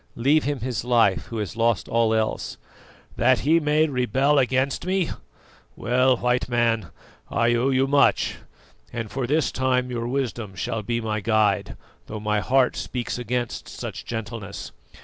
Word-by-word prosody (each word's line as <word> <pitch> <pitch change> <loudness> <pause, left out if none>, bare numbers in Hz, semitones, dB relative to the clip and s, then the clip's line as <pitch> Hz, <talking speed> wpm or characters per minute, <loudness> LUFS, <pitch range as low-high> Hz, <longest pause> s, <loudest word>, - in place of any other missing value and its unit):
Leave 140 +6 +3
him 145 -2 -2
his 120 -3 -2
life 115 -5 +3
who 115 - -6
has 105 -3 -4
lost 115 -1 +1
all 115 -1 +2
else." 110 -1 -1 0.6
"That - - +3
he 160 +4 +4
may 150 0 +2
rebel 135 +1 +2
against 130 +1 +1
me? 185 -1 0 0.6
Well, 125 +1 +2
White 125 +1 0
Man, 115 -5 +1 0.4
I 115 +1 +2
owe 120 +3 +2
you 130 0 +3
much, 140 +1 +3 0.5
and 115 -3 -5
for 130 -2 -2
this 150 +2 +1
time 125 -1 0
your 120 -1 -3
wisdom 120 -6 -3
shall 110 +4 -3
be 115 +2 -2
my 110 -1 -2
guide, 110 -1 +1 0.3
though 110 - -6
my 105 0 0
heart 125 +6 +2
speaks 125 -1 -4
against 120 0 -3
such - - -6
gentleness. 110 -3 -6
120 Hz, 155 wpm, -24 LUFS, 110-130 Hz, 0.6 s, he